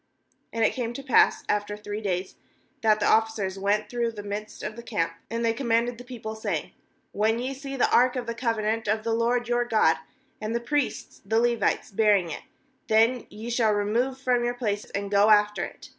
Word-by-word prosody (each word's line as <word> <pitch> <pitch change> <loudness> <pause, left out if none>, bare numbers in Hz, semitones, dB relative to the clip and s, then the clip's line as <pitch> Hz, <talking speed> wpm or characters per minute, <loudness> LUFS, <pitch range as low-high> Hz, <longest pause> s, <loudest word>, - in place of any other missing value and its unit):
2And 225 -1 +1
it - - +2
came 240 -2 -3
to 275 - -7
pass 265 - +4
after 205 0 -1
three 210 0 -5
days, 185 -2 -2 0.5
that 215 -1 +4
the - - 0
officers 220 -4 +1
went 205 +2 +1
through 240 -1 -1
the 210 -2 -8
midst 205 +1 -6
of 210 0 -4
the 235 - -8
camp; 205 -8 -1 0.2
3and 230 0 -2
they 230 -1 +2
com 250 +2 -5
manded 235 +1 +1
the - - -8
people, 235 -3 -7
saying: 220 - -3 0.4
'When 220 +2 +1
ye 255 +3 -3
see 275 0 -7
the 260 - +3
ark 250 +1 +4
of 250 -1 -3
the 235 - -3
covenant 225 -2 -1
of 215 +1 0
the 230 0 0
LORD 235 +1 +1
your 240 0 +2
God, 215 -9 +3 0.4
and 215 +2 -2
the - - +1
priests 290 +4 -2
the 225 0 +1
Levites 235 -2 +1
bearing 200 -4 +3
it, - - -5 0.5
then 225 +3 +3
ye 220 +3 -7
shall 230 -3 +3
re 205 0 0
move 245 +5 0
from 250 -2 +1
your 240 0 -1
place, 210 -4 -2
and 200 0 -5
go 205 +1 +5
after 210 0 +4
it. - - -9
225 Hz, 215 wpm, -26 LUFS, 210-240 Hz, 0.5 s, go